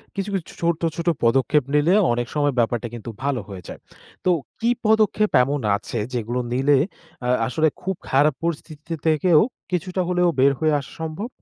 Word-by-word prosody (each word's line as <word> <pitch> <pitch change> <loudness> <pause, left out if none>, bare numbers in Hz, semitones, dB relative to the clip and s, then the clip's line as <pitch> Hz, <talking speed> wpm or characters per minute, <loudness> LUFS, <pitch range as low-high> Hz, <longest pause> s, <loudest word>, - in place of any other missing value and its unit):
কিছু, 195 0 -3
কিছু 185 -4 -2
ছো - - -13
ছোট্ট, 170 -1 0
ছোট 170 0 -5 0.2
পদক্ষেপ 130 +4 +3
নিলে 150 +5 +4 0.2
অনেক 120 0 -2
সময় 145 -1 +2
ব্যাপারটা 120 0 0
কিন্তু 120 0 -7
ভালো 140 -3 0
হয়ে 95 -2 -7
যায়। - - -8 0.5
তো - - +3 0.3
কি 235 +1 +1 0.2
পদক্ষেপ 215 -1 +3
এমন 140 +2 -1 0.2
আছে 115 - -5 0.2
যেগুলো 120 +1 -2
নিলে 135 +3 +3 0.5
আ - - +1 0.2
আসলে 155 +5 +2
খুব 190 0 -2
খারাপ 145 +2 +4
পরিস্থিতিতে 165 -1 -4
থেকেও 160 +1 +4 0.3
কিছুটা 185 +1 -1
হলেও 180 -1 +3
বের 140 +2 +6
হয়ে 155 -1 +2
আসা 140 - -10
সম্ভব? 160 +7 -4
150 Hz, 175 wpm, -22 LUFS, 130-175 Hz, 0.5 s, বের